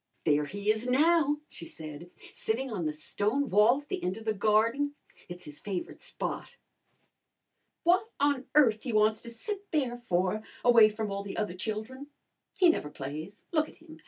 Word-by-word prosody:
"There 150 -2 +3
he 205 +6 0
is 220 +3 -2
now," 295 +2 +3
she 165 - -11
said, 155 +2 -9 0.2
"sitting 250 +4 -2
on 180 -7 -2
the - - 0
stone 210 - -1
wall 215 +8 +5
at 285 - -30
the - - -3
end 180 +3 -1
of 225 - -10
the 220 - +1
garden. 230 +8 +2 0.3
It's 175 0 -9
his 150 -1 -10
favourite 190 -4 -5
spot." 485 - -5 1.3
"What 370 +6 +3
on 285 -2 +1
earth 230 -8 +5
he 245 - -4
wants 215 0 +3
to 235 - -8
sit 400 - -5
there 265 -6 0
for 190 -3 0 0.2
away 230 -3 +8
from 215 -1 -4
all 200 0 -2
the 200 -1 -7
other 210 -4 -1
children! 220 +8 -5 0.5
He 370 -2 +6
never 150 - 0
plays. 155 +9 -7
Look 310 -2 +1
at - - -17
him! 320 0 -14
220 Hz, 180 wpm, -29 LUFS, 195-285 Hz, 1.3 s, away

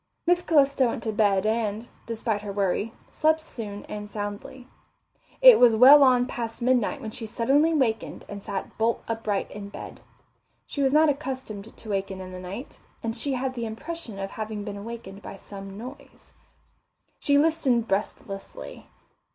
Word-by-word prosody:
Miss 350 0 +4
Calista 280 -6 +3
went 230 - -3
to 220 - -1
bed 205 -2 +2
and, 220 0 -1 0.2
despite 225 -2 -2
her 205 -1 -5
worry, 200 +2 0 0.2
slept 315 +1 +2
soon 215 -10 -7
and 210 0 -7
soundly. 205 +5 -6 0.8
It - - +10
was 240 -2 +7
well 270 +6 +9
on 250 -2 +5
past 230 -2 -5
midnight 245 -2 +1
when 220 - -5
she 225 0 -6
suddenly 270 +8 +3
wakened 255 -8 -1
and 200 0 -7
sat 195 -1 -5
bolt 225 +1 +1
upright 225 -3 -2
in 200 -1 -7
bed. - - -9 0.6
She 285 - -4
was 270 -1 +3
not 305 +1 +5
accustomed 260 -7 -4
to 220 - -11
waken 195 -1 -2
in 185 0 -8
the 185 - -7
night, 195 +9 -8 0.2
and 225 0 -2
she 270 +4 -2
had 260 0 -1
the 235 -2 -3
impression 235 0 -6
of 195 0 -4
having 215 -1 -5
been 205 -1 -5
awakened 205 -2 -8
by - - -8
some 195 0 -10
noise. 255 +6 -11 0.9
She 285 0 +3
listened 285 -7 +2
breathlessly. 195 +1 -4
225 Hz, 165 wpm, -26 LUFS, 205-265 Hz, 0.9 s, It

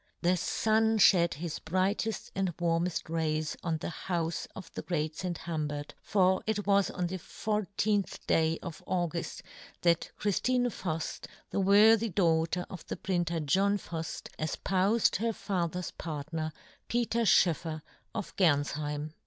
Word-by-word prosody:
The 180 +2 +4
fun 220 +4 +2
fhed 180 -4 +5
his 160 +1 -4
brighteft 190 +5 -1
and 190 -4 -1
warmeft 170 0 0
rays 155 -1 -1
on 165 -2 0
the 165 +1 -5
houfe 170 -2 -1
of 185 -3 -9
the - - -4
great 155 -3 -2
St. 175 0 -3
Humbert, 150 -3 -4
for 190 -2 +3
it 210 -2 0
was 200 -1 +3
on 180 - -2
the 185 +2 -3
14th 205 +1 -1
day 160 0 +2
of 170 -4 -7
Auguft 175 -2 -2 0.4
that 170 -1 +3
Chriftine 245 +4 +1
Fuft, 165 -5 -4 0.2
the - - 0
worthy 215 +3 +6
daughter 170 -1 +1
of 185 -4 -8
the - - -4
printer 175 -3 -1
John 195 +7 +2
Fuft, 165 -4 -6
efpoufed 190 +7 +2
her 230 +2 0
fa 180 -5 -1
ther's 180 +1 -4
partner, 155 0 -4 0.4
Peter 235 0 +1
Schoeffer 160 -6 +3 0.3
of 215 -4 -4
Gernfheim. 150 -2 +1
175 Hz, 140 wpm, -30 LUFS, 160-200 Hz, 0.4 s, worthy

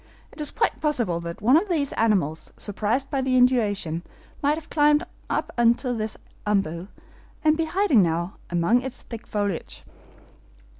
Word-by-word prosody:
It - - -9
is 295 - +2
quite - - 0
possible 240 - +1
that 170 +3 -7
one 250 +6 +6
of 370 +6 +3
these 295 -6 0
animals, 190 -9 0
surprised 220 +6 -1
by 275 -2 0
the 260 -1 +2
inundation, 210 -10 +2 0.4
might 290 +1 +3
have 310 -1 -9
climbed 295 -1 +3 0.2
up - - -1
into 240 +2 +3
this 220 -2 -3 0.3
OMBU, 190 -4 0 0.6
and 310 0 +4
be 325 0 0
hiding 345 - +3
now 170 +1 -1
among 175 +8 +2
its 265 0 -7
thick 230 -1 -9
foliage." 205 -4 -3
235 Hz, 155 wpm, -25 LUFS, 195-290 Hz, 0.6 s, one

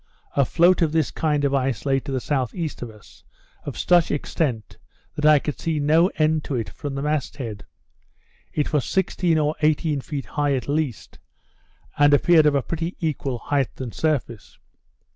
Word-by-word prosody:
A 140 - +3
float 175 +7 +3
of 160 -2 +2
this 160 -4 +1
kind 150 -3 0
of 140 - 0
ice 135 -4 -1
lay 135 -1 +2
to 135 - -7
the - - -1
S.E. 130 +3 -2 0.5
of 120 - -5
us, 105 -2 -17 0.4
of - - -6
such 175 -2 +3
extent, 140 -5 -2 0.3
that 150 0 +1
I 155 -1 +7
could 145 +1 -4
see 160 -2 -1
no 155 +4 +4
end 155 -1 +1
to 140 - -3
it 115 -3 -2
from 145 -3 -6
the 135 - -3
mast 150 -2 -2
head. 110 -6 -7 0.8
It 150 0 -2
was 145 -3 +2
sixteen 175 0 0
or 150 0 +1
eighteen 150 -1 +1
feet 140 0 -5
high 145 -1 0
at 130 - -4
least; 145 -5 -3 0.8
and 145 0 +6
appeared 160 +1 +5
of 145 - +3
a 140 - +1
pretty 165 +2 -4
equal 145 -6 -2
height 140 +1 -2
and 125 -4 -5
surface. 135 -9 -2
145 Hz, 180 wpm, -23 LUFS, 135-155 Hz, 0.8 s, I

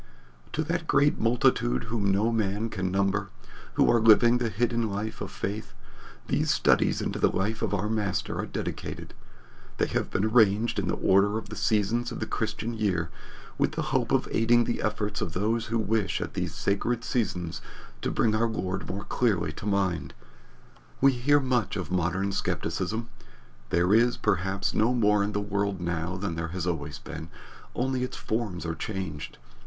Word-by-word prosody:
'" 60 0 -28
To 155 - 0
that 160 0 -2
great 145 +1 +3
multitude 85 - +2
whom 105 -3 -1
no 105 +4 +2
man 110 0 0
can 95 -4 -2
number, 100 0 +1 0.5
who - - +4
are 120 - +4
living 115 +2 +6
the 120 -2 0
hidden 115 0 0
life 105 +2 -4
of - - -4
faith, 105 +3 -5 0.5
these - - 0
studies - - +3
into - - -2
the - - +4
life 105 +4 -1
of 110 - 0
our 105 +1 0
Master 105 -3 -1
are - - -2
dedicated. - - -5 0.6
They - - +2
have - - -2
been 95 - 0
arranged 110 0 +3
in - - -2
the - - 0
order 100 +3 +3
of 110 - -7
the - - -6
seasons 110 +3 +1
of - - -5
the - - -2
Christian 115 +1 -2
year, 95 -7 -1 0.5
with - - +2
the - - -2
hope - - +1
of - - +2
aiding 120 +1 +4
the 120 - -2
efforts 105 -1 -2
of 80 - -3
those 110 +5 0
who 115 - 0
wish 110 -2 0
at - - -4
these - - -3
sacred 115 +4 0
seasons 90 -10 -2 0.4
to - - -1
bring 110 - +2
our 115 +2 +2
Lord 95 -4 -3
more 100 +2 -4
clearly 100 -13 0
to 95 - -7
mind. 90 -9 0 0.8
We 135 +1 +6
hear 135 +4 +3
much 125 -8 0
of 90 -2 -4
modern 90 +2 0
skepticism. 110 +3 -2 0.6
There 90 +3 +3
is, 120 +2 +4
perhaps, 95 +1 0
no 115 +4 +2
more 105 -3 +3
in 105 +1 -2
the 105 - 0
world 100 -1 -1
now 85 +1 -2
than 95 -2 -3
there 80 0 -3
has 85 +1 -4
always 80 -4 -3
been, 80 0 -8 0.5
only 130 0 0
its 125 - -4
forms 105 -6 -3
are 80 - -1
changed. 95 -5 -5
105 Hz, 180 wpm, -27 LUFS, 95-115 Hz, 0.8 s, living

